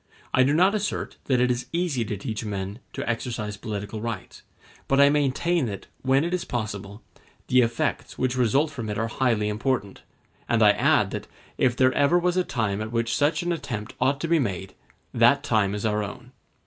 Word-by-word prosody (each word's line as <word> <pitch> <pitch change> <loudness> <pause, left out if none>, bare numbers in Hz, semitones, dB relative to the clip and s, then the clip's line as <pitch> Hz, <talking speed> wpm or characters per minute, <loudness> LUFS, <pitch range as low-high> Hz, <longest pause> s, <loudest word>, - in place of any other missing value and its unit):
I 130 - +5
do 130 +2 +4
not 180 +6 +4
assert 210 -1 -2
that 130 -3 +2
it 125 0 +3
is 120 0 -3
easy 170 -8 0
to 105 -1 -3
teach 110 +1 -4
men 100 0 -4
to - - -4
exercise 115 -3 -3
political 105 0 -5
rights; 115 -4 -6 0.5
but 135 - +2
I 140 0 +7
maintain 150 +2 +1
that, 100 -3 -6 0.2
when 135 +2 +3
it 170 +2 -2
is 180 -1 0
possible, 105 -3 -5 0.5
the 125 0 +5
effects 115 -1 -1
which 130 -1 0
result 130 +5 +2
from 120 -7 -5
it 105 - -3
are 115 +1 -1
highly 115 -3 +1
important; 105 -1 -2 0.5
and 115 -2 +3
I 105 - +8
add - - +2
that, - - -5 0.3
if 125 -2 +3
there 130 +1 +3
ever 145 +5 +4
was 175 0 +1
a 185 - +2
time 110 - -1
at 110 +1 -4
which 115 0 0
such 150 +4 +1
an 175 - -1
attempt 120 -9 -4
ought 140 +1 +2
to 165 - -1
be 165 0 +3
made, 95 -6 -3 0.4
that 120 +5 +4
time 105 -7 +1
is 105 - -3
our 105 -1 +1
own. 120 +5 -8
120 Hz, 200 wpm, -25 LUFS, 105-140 Hz, 0.5 s, I